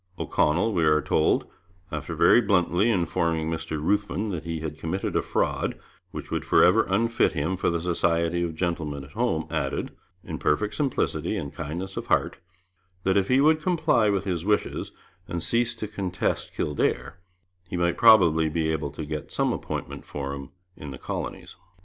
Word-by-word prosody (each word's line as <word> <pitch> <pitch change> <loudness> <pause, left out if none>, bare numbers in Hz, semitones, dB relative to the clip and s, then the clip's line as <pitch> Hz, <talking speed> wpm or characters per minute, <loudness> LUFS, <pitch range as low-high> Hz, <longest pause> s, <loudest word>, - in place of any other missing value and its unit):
O'Connell, 90 +9 +1
we 85 -4 +1
are 75 0 +4
told, 80 0 +2 0.5
after 80 +1 -4
very 85 +9 +6
bluntly 100 0 +2
informing 85 -5 0
Mr 80 -1 -3
Ruthven 100 +5 0
that 85 -4 -4
he 80 -2 -3
had 75 -1 -5
committed 85 +5 -3
a - - +3
fraud - - -1 0.3
which - - -8
would - - -1
forever 100 +6 +4
unfit 115 +4 +2
him 80 +6 -1
for 90 - 0
the 85 -1 0
society 85 0 +1
of 85 -2 -2
gentlemen 80 -5 -2
at 70 - -13
home, - - 0
added, - - -2 0.3
in - - -6
perfect 90 +8 +1
simplicity 110 - -1
and 75 -7 -5
kindness 85 +5 -5
of - - -4
heart, - - +1 0.7
that 95 - +2
if 100 -1 +2
he 130 +1 +4
would 155 +2 +4
comply 155 - +2
with 100 -1 0
his 90 -4 -2
wishes 105 +2 -1 0.4
and 85 -1 -4
cease 115 0 +1
to 110 -1 -5
contest 95 -3 -2
Kildare, 70 +1 -1 0.5
he - - -3
might 85 0 +1
probably 85 -9 +6
be 80 0 0
able 75 -2 -2
to 75 +2 -6
get 75 0 -5
some - - +1
appointment - - -5
for 70 -1 -5
him 70 -1 -7 0.3
in 75 - -8
the 65 - -7
colonies.' - - -6
85 Hz, 175 wpm, -26 LUFS, 80-100 Hz, 0.7 s, very